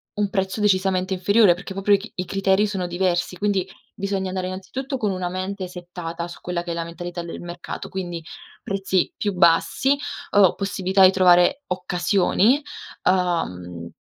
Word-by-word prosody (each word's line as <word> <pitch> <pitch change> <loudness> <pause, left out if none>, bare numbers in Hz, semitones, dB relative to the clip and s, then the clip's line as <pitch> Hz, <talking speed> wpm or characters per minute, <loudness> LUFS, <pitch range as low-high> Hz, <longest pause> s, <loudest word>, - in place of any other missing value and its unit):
un 205 -1 0
prezzo 190 +1 -1
decisamente 190 -2 +2
inferiore, 200 +1 +4
perché 190 +2 -9
proprio 195 +1 +2
i - - +6
c 220 - -10
i 180 - -3
criteri 195 +2 +2
sono 190 -3 -2
diversi, 175 0 -1
quindi 200 -1 0 0.3
bisogna 195 -1 -2
andare 185 0 -3
innanzitutto 260 +9 -5
con 210 -5 0
una 185 -1 -2
mente 185 +1 -4
settata 175 -1 -6
su 175 - -11
quella 175 -1 -3
che 175 - -5
è - - -1
la 170 0 -2
mentalità 175 +1 -6
del 170 - -7
mercato, 175 0 -7
quindi 175 -3 -5 0.4
prezzi 195 -2 0
più 205 - -1
bassi 175 +11 +3 0.3
o 200 -3 +5
possibilità 195 -1 +1
di 185 - +7
trovare 185 +8 +4
occasioni. 190 - +2 0.5
Uhm, 90 - -1
185 Hz, 160 wpm, -23 LUFS, 175-195 Hz, 0.5 s, di